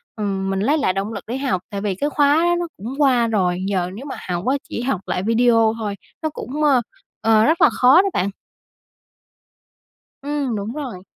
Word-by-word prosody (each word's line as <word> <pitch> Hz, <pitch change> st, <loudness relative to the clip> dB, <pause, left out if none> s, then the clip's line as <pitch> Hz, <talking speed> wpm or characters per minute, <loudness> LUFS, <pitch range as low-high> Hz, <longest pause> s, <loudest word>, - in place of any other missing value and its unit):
ừm, 195 Hz, -2 st, -2 dB
mình 195 Hz, 0 st, -1 dB
lấy 285 Hz, +10 st, +2 dB
lại 235 Hz, -11 st, +1 dB
động 200 Hz, +3 st, -3 dB
lực -, -, -6 dB
để 245 Hz, +3 st, -3 dB
học, 255 Hz, -10 st, -1 dB
tại 200 Hz, -2 st, -5 dB
vì 200 Hz, -3 st, -1 dB
cái 290 Hz, +8 st, -1 dB
khóa 290 Hz, 0 st, +3 dB
đó 345 Hz, 0 st, +3 dB
nó 345 Hz, -, -2 dB
cũng 230 Hz, +7 st, -6 dB
qua 250 Hz, -4 st, +4 dB
rồi, 185 Hz, -5 st, 0 dB
giờ 180 Hz, -2 st, 0 dB
nếu 250 Hz, +8 st, -8 dB
mà 275 Hz, -, -6 dB
học 175 Hz, +3 st, -2 dB
á 265 Hz, -, +3 dB
chỉ -, -, -4 dB
học 245 Hz, -7 st, -1 dB
lại 180 Hz, -, -2 dB
video 230 Hz, 0 st, +3 dB
thôi, 205 Hz, -2 st, -3 dB, 0.3 s
nó 315 Hz, -, +1 dB
cũng, 295 Hz, +4 st, -4 dB
ơ, 270 Hz, -5 st, +4 dB, 0.4 s
ờ, 220 Hz, -1 st, +4 dB
rất 320 Hz, +2 st, +2 dB
là -, -, +7 dB
khó 265 Hz, +8 st, +5 dB
đó 395 Hz, -, -1 dB
bạn. 190 Hz, +2 st, 0 dB, 1.9 s
Ừm, 285 Hz, -4 st, -2 dB
đúng 210 Hz, +3 st, -4 dB
rồi. 250 Hz, -12 st, -6 dB
230 Hz, 210 wpm, -21 LUFS, 200-280 Hz, 1.9 s, là